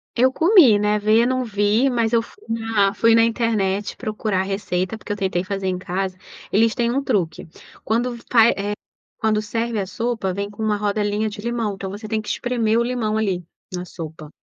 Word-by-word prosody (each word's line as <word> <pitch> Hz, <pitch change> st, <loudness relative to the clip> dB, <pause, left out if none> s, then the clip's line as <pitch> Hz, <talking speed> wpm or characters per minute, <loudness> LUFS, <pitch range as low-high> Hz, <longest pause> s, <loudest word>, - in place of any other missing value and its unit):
Eu 255 Hz, +2 st, +3 dB
comi, 325 Hz, -, +6 dB
né, 210 Hz, 0 st, +2 dB
ver 215 Hz, +2 st, +4 dB
eu -, -, +2 dB
não 255 Hz, 0 st, 0 dB
vi, 215 Hz, +3 st, +2 dB
mas 235 Hz, -2 st, 0 dB
eu 230 Hz, -, +4 dB
fui 405 Hz, -, -16 dB
na 225 Hz, -3 st, +1 dB
fui 225 Hz, +2 st, +4 dB
na 230 Hz, -, +6 dB
internet 215 Hz, -4 st, 0 dB
procurar 215 Hz, -2 st, -2 dB
a -, -, -1 dB
receita, 190 Hz, 0 st, -2 dB
porque 215 Hz, -, -8 dB
eu -, -, 0 dB
tentei 190 Hz, -3 st, -1 dB
fazer 195 Hz, 0 st, -3 dB
em 185 Hz, -1 st, 0 dB
casa, 185 Hz, 0 st, -3 dB, 0.3 s
eles 225 Hz, +3 st, +3 dB
têm 235 Hz, -1 st, 0 dB
um 275 Hz, +3 st, 0 dB
truque, 190 Hz, -13 st, -1 dB, 0.4 s
quando 240 Hz, +3 st, 0 dB
f 235 Hz, -, -13 dB
vai, 230 Hz, -1 st, +7 dB
eh, 205 Hz, +1 st, -2 dB, 0.5 s
quando 215 Hz, -1 st, +1 dB
serve 225 Hz, +1 st, -2 dB
a 195 Hz, -, -1 dB
sopa, 225 Hz, -2 st, -2 dB
vem 200 Hz, +2 st, -3 dB
com 205 Hz, +2 st, -7 dB
uma 215 Hz, -1 st, +1 dB
rodelinha 210 Hz, +1 st, 0 dB
de 205 Hz, 0 st, -8 dB
limão, 230 Hz, -3 st, -2 dB
então 190 Hz, 0 st, -6 dB
você 210 Hz, +2 st, -7 dB
tem 215 Hz, 0 st, -1 dB
que 210 Hz, -, -8 dB
espremer 230 Hz, -2 st, 0 dB
o -, -, +2 dB
limão 235 Hz, -3 st, -1 dB
ali, 195 Hz, -5 st, -1 dB, 0.3 s
na 180 Hz, 0 st, -4 dB
sopa. 160 Hz, -3 st, -9 dB
215 Hz, 210 wpm, -21 LUFS, 200-230 Hz, 0.5 s, vai